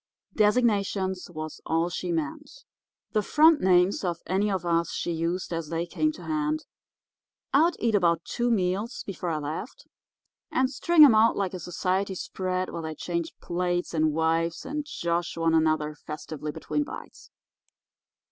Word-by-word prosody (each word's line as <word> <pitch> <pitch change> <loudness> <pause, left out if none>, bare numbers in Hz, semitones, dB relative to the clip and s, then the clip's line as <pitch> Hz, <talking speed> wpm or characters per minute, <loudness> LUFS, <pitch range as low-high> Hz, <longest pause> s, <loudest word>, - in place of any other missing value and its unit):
Designations 205 -4 +1
was 155 -2 -7
all 165 +2 0
she 180 0 -3
meant. 160 -4 -3 0.6
The 215 - +2
front 305 +7 +5
names 180 +1 +3
of 175 -3 -1
any 195 +3 +1
of 190 -3 -2
us 170 0 +1
she - - -2
used 170 +2 -2
as 165 -2 -3
they 165 +1 -1
came 310 - 0
to - - -11
hand. 310 0 -1 0.9
I'd 325 +4 +4
eat 230 -2 0
about 170 -4 +2
two 240 0 -1
meals 200 +2 0
before 180 -2 -4
I 160 - -1
left, 155 - -6 0.7
and 260 0 +1
string 315 +3 +6
'em 265 - +6
out 220 +1 +4
like 195 -2 -1
a 185 - -5
society 185 +3 -1
spread 185 0 -3
where 170 - -5
they 160 -1 -5
changed 170 +1 -4
plates 175 0 -1
and 155 -1 +2
wives, 165 +2 0
and 295 0 -4
josh 170 - -2
one 165 0 +2
another 155 -1 +2
festively 150 0 -6
between 295 - -2
bites. 295 - -10
180 Hz, 155 wpm, -27 LUFS, 165-215 Hz, 0.9 s, string